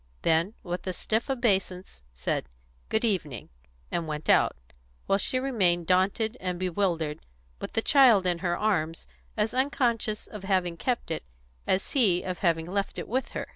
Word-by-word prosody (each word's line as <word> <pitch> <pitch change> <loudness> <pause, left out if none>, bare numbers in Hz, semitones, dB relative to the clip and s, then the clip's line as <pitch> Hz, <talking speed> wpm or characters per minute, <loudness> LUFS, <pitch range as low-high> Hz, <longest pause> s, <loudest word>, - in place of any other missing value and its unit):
Then, 170 +6 +2
with 180 0 -5
a 185 - -1
stiff 220 +8 -1
obeisance, 195 - 0
he - - -30
said, 65 - -2 0.4
"Good 220 +2 +1
evening," 155 - -2 0.4
and 170 -2 -2
went 150 0 -4
out, - - +4 0.5
while 195 - +2
she 255 - 0
remained 190 -10 +1
daunted 195 +6 +1
and 180 -1 -2
bewildered, 175 -4 -1 0.4
with - - -6
the 225 - 0
child 245 -9 +6
in 175 -2 +1
her 175 -1 0
arms, 170 -7 0 0.3
as 215 +1 +1
unconscious 245 -5 0
of 210 -3 -10
having 185 -3 +1
kept 240 0 -2
it 160 - -3 0.4
as 190 +1 0
he 200 -10 +3
of 185 -1 -4
having 165 -3 +1
left 195 +3 -2
it - - -5
with 260 +4 -2
her. - - -4
190 Hz, 170 wpm, -27 LUFS, 175-220 Hz, 0.5 s, child